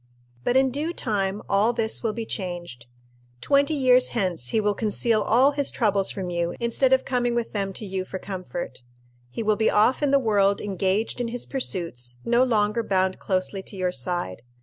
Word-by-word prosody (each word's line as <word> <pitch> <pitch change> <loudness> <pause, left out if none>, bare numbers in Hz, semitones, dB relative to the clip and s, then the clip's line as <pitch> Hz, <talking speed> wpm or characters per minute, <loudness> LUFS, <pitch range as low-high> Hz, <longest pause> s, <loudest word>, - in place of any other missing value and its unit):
But 245 - +2
in 265 -1 +3
due 305 +6 -2
time 205 - -2
all 210 +4 +3
this 225 -1 -1
will 225 - 0
be 230 0 -4
changed. 175 - -6 0.5
Twenty 285 - +2
years 255 -2 +4
hence 180 - -1
he 220 - +1
will 210 -1 +1
conceal 215 +1 0
all 260 +5 +4
his 285 -1 -1
troubles 200 -4 +1
from 185 -2 -4
you 170 0 -1
instead 235 +3 +1
of 265 0 +3
coming 245 -2 0
with 235 -1 -2
them 200 -2 -1
to 215 - -5
you 190 -1 -3
for 185 - -6
comfort. 180 -7 -6 0.5
He 225 - -4
will 215 -1 +2
be 220 - +3
off 220 +7 +3
in 290 - +2
the 280 - +5
world 200 -5 +2
engaged 200 +4 -1
in 240 - -1
his 240 +1 -4
pursuits, 165 - -3
no 240 +2 +4
longer 215 -2 +1
bound 190 -3 0
closely 190 0 -1
to 195 - -9
your 185 -1 0
side. 130 - -3
210 Hz, 195 wpm, -25 LUFS, 185-240 Hz, 0.5 s, the